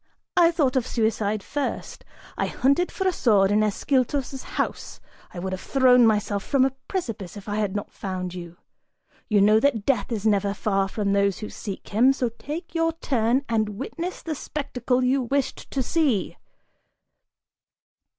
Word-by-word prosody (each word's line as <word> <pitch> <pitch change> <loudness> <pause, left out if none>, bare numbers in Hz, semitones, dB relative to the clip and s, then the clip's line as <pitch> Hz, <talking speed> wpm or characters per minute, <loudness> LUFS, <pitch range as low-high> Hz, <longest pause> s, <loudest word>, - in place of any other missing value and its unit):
I 345 -2 +6
thought 295 -7 +1
of 255 -2 +1
suicide 215 -2 0
first. 290 -1 -4 0.3
I - - -1
hunted 280 +7 +1
for 380 - -1
a - - +4
sword 205 - +3
in 210 +1 +3
Ascyltos' 265 +5 0
house: - - -4 0.3
I - - -11
would 190 +2 -3
have 185 - -5
thrown 250 -3 +5
myself 210 -2 0
from 270 -2 +3
a 265 - 0
precipice 225 - -4
if 200 - -11
I 205 0 -2
had 205 -2 -1
not 205 - -4
found 185 -2 -5
you! 175 -1 -8 0.7
You 210 -2 +4
know 215 +2 +6
that 230 -5 +1
Death 245 -6 +1
is 220 -2 -3
never 200 -2 +2
far 195 -2 0
from 200 0 -1
those 200 -1 +2
who 210 - -7
seek 200 -3 -7
him, 245 +6 +4
so 250 -3 -1
take 300 +9 -7
your 330 -1 +1
turn 260 -3 0
and 215 -3 -1
witness 335 - -5
the 320 - -3
spectacle 255 -4 -2
you 260 +2 +2
wished 270 +2 -2
to 265 - -1
see!" 270 - +1
230 Hz, 170 wpm, -24 LUFS, 205-275 Hz, 0.7 s, I